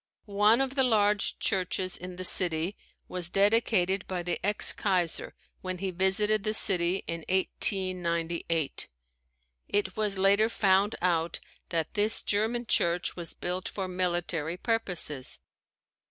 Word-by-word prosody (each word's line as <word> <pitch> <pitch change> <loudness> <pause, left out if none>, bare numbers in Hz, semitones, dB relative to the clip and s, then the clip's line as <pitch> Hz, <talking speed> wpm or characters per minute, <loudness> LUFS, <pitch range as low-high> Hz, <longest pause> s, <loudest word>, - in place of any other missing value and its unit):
One 210 +3 +3
of 270 -1 -2
the 270 -1 +2
large 210 -4 +1
churches 185 -1 0
in 180 0 -7
the 185 +1 -5
city 175 +1 +3 0.3
was 180 -1 +1
dedicated 195 -2 +2
by 180 -2 -4
the 175 0 -4
ex 205 +1 +5
kaiser 180 -5 -1 0.3
when 185 -1 -5
he 190 +1 -4
visited 195 +3 +1
the 215 0 -1
city 185 -2 +2
in 165 - -4
1898. 170 -4 0 0.8
It 195 -2 -1
was 210 -2 -1
later 200 +3 +3
found 200 -1 +2
out 170 -2 0 0.3
that 165 -2 -2
this 210 +1 0
German 225 +4 0
church 175 -4 +1
was 170 -2 -3
built 180 +1 -4
for 195 -2 -5
military 175 -3 -2
purposes. 180 - -2
185 Hz, 130 wpm, -28 LUFS, 175-205 Hz, 0.8 s, ex